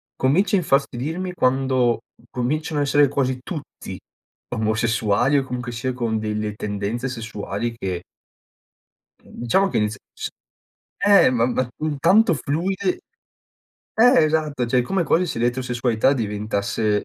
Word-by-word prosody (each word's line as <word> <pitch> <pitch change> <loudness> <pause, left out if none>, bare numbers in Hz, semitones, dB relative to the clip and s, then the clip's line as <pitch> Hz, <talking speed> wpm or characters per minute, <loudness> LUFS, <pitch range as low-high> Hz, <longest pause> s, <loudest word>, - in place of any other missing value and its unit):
comincio 165 +11 +2
a - - +4
infastidirmi 155 +4 -1
quando 130 -5 +2 0.3
cominciano 150 +5 -2
a - - +2
essere 145 +1 +4
quasi 130 -2 -1
tutti 155 -3 -7 0.6
omosessuali 110 +3 +1
o - - -2
comunque 125 -1 -5
sia 120 +2 -3
con 115 -3 -1
delle 105 -1 -2
tendenze 105 +5 -3
sessuali 115 -1 -4
che 90 -5 -4 1.2
diciamo 190 +12 0
che - - -1
inizial 105 0 -2
s - - -5 0.7
ehm, 200 -10 +5
ma 115 -1 +2
ma 130 -1 0 0.3
tanto 205 +3 +5
fluide 180 +7 -1 0.9
eh 245 -3 +6
esatto 150 -5 0
cioè 125 +1 +2
come 180 +8 0
quasi 170 +3 +2
se 160 - -4
l'eterosessualità 120 0 +1
diventasse 105 -2 -1
125 Hz, 125 wpm, -22 LUFS, 110-150 Hz, 1.2 s, eh